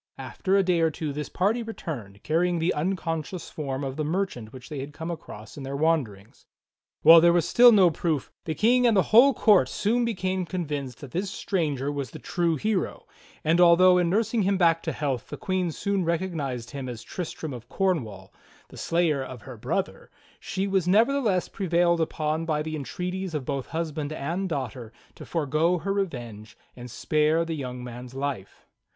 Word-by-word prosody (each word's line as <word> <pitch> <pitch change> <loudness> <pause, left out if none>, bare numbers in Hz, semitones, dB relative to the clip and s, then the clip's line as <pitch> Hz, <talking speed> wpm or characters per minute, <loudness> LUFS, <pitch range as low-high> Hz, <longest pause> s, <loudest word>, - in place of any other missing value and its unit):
After 195 +1 -1
a 195 - +4
day 180 -2 +2
or 165 -1 +3
two 155 -1 -4
this 150 0 -5
party 210 +6 0
returned, 125 - -7
carrying 175 +3 +1
the 165 +2 +1
uncon 165 0 -1
scious 180 +3 -8
form 140 -2 -4
of 135 -1 -4
the 155 - -1
merchant 155 - -2
which 130 -1 -11
they 150 - -6
had 140 +2 -7
come 160 +2 -5
across 110 -9 -9
in - - -7
their 135 +1 -5
wanderings. 135 -10 -1 0.6
While 165 0 +9
there 170 +1 +6
was 170 -1 +2
still 245 +5 +7
no 190 -6 +6
proof, 155 -4 -2
the 160 - -2
King 245 +5 +4
and 225 -3 +3
the 190 - +5
whole 255 +5 +8
court 210 -5 +4
soon 235 +4 0
became 185 -4 -1
convinced 145 -9 -4
that 140 - -9
this 190 +6 -2
stranger 145 -9 -2
was 140 -3 -4
the - - -9
true 170 -2 -1
hero; 190 +3 -2 0.4
and 165 +3 +3
although 180 +1 +6
in 175 -1 +1
nursing 220 +4 +1
him 195 0 +1
back 165 -2 +3
to - - -3
health 135 -5 -3
the - - -6
Queen 185 -2 -1
soon 200 +3 -1
recognized 160 -8 -2
him 135 -3 -5
as 120 -1 -7
Tristram 160 -3 -6
qf 120 -2 -9
Cornwall, 120 - -2 0.4
the - - -13
slayer 165 -5 +1
of 125 -4 -9
her 130 - -9
brother, 105 - -3 0.3
she 195 0 -3
was 190 -3 0
nevertheless 220 -1 +2
prevailed 170 -2 +1
upon 155 0 -1
by 150 -2 0
the 155 0 -4
entreaties 180 +4 -4
of 140 -4 -3
both 135 -1 -3
husband 155 -2 -3
and 170 +6 -3
daughter 130 -6 -4 0.2
to - - -12
forego 160 +2 +1
her 195 +4 -2
revenge 120 - -5 0.2
and 125 0 -9
spare 155 +6 +1
the 165 - -3
young 125 -4 -5
man's 125 +1 -9
life. 135 -8 -5
165 Hz, 190 wpm, -26 LUFS, 140-185 Hz, 0.6 s, While